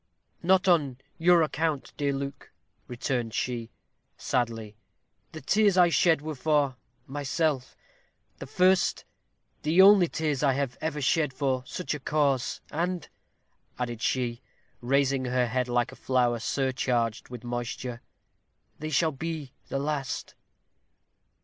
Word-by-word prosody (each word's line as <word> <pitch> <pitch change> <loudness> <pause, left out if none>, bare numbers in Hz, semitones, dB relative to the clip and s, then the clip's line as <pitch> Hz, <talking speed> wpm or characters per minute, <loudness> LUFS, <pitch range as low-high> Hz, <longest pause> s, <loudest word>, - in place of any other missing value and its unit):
"Not 190 +2 +3
on 145 -8 +3 0.2
your 175 +1 +5
own - - +4
account, 155 -2 -2
dear 145 -1 0
Luke," 140 0 -5 0.4
returned 120 -2 -2
she, 120 -2 -2 0.5
sadly. 115 -4 -2 0.6
"The 155 - -8
tears 205 +6 +3
I 175 -1 +6
shed 165 -3 +3
were 155 0 -4
for 145 -1 +1 0.3
myself 145 -1 -2 0.6
the - - -7
first, 185 0 +2 0.6
the 160 +4 +1
only 195 -3 +7
tears 155 -4 -1
that 145 - +3
I - - +3
have 135 -2 -2
ever 150 -2 -2
shed 150 +1 +1
for 130 -2 -1
such 180 0 -3
cause; 140 -4 0
and," 175 +1 -2 0.7
added 120 -2 -4
she, 120 -1 -1 0.4
raising 135 +1 +1
her 125 0 +1
head 125 +1 -1
like 120 -1 0
a - - -11
flower 125 -2 +1
surcharged 125 -2 -1
with 125 -1 -8
moisture, 120 0 -4 0.8
"they 155 - -4
shall 155 +2 +2
be 155 -2 -5
the - - -2
last." 140 -2 -3
140 Hz, 130 wpm, -27 LUFS, 125-160 Hz, 0.8 s, only